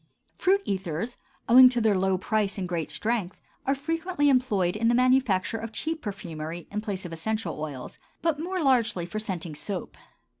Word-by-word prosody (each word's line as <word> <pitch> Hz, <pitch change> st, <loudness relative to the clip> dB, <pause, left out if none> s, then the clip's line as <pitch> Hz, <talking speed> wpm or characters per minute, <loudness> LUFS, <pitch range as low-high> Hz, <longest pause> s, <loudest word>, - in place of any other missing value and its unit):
Fruit 390 Hz, +2 st, +2 dB
ethers, 190 Hz, +3 st, -3 dB, 0.3 s
owing 255 Hz, +2 st, +9 dB
to 245 Hz, -1 st, 0 dB
their 220 Hz, -3 st, +3 dB
low 190 Hz, 0 st, +2 dB
price 205 Hz, +1 st, -1 dB
and 185 Hz, -2 st, -2 dB
great 170 Hz, -3 st, -2 dB
strength, 215 Hz, -5 st, -2 dB, 0.3 s
are 275 Hz, -, +3 dB
frequently 325 Hz, +1 st, 0 dB
employed 210 Hz, -9 st, +2 dB
in 230 Hz, +2 st, +1 dB
the 235 Hz, -, +4 dB
manufacture 250 Hz, -5 st, +2 dB
of 225 Hz, 0 st, -6 dB
cheap 320 Hz, +6 st, -3 dB
perfumery, 170 Hz, -5 st, -6 dB
in 210 Hz, +1 st, -2 dB
place 200 Hz, -3 st, -4 dB
of 170 Hz, -, -6 dB
essential 175 Hz, -1 st, -3 dB
oils, 140 Hz, -5 st, -6 dB, 0.2 s
but 325 Hz, -3 st, +1 dB
more 360 Hz, +1 st, -2 dB
largely 235 Hz, -10 st, +2 dB
for 195 Hz, +5 st, -4 dB
scenting 180 Hz, -6 st, -4 dB
soap. 180 Hz, +5 st, -5 dB
215 Hz, 175 wpm, -27 LUFS, 180-255 Hz, 0.3 s, owing